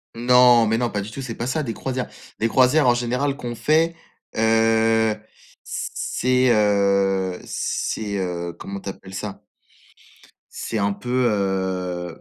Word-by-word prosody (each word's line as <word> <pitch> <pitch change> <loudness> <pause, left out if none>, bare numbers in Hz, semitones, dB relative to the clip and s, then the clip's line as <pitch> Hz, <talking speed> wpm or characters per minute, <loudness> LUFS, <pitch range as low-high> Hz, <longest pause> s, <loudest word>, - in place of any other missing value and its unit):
Non, 120 0 +6
mais 110 +1 +1
non, 120 -1 0
pas 105 - -2
du 105 +3 -7
tout, 135 - -6
c'est 115 -4 -5
pas 120 - -4
ça, 140 +5 0
des 115 -6 -3
croisières. 130 -1 -3 0.3
Les 115 - +2
croisières, 130 +4 +4
en 120 - +6
général 125 +4 -1
qu'on 120 -3 -5
fait, 160 +7 +2 0.4
heu, 110 0 +3 0.5
c - - -4 0.2
c'est, 130 0 +2
heu, 100 -3 +2
c'est, 105 -2 -3
heu, 85 -2 -3
comment 100 +2 -6
tu 100 - -12
appelles 95 0 -10
ça? 100 +1 -6 1.1
C'est 115 - -4
un 100 0 +1
peu, 125 +4 0
heu 95 -4 -2
110 Hz, 150 wpm, -22 LUFS, 100-125 Hz, 1.1 s, Non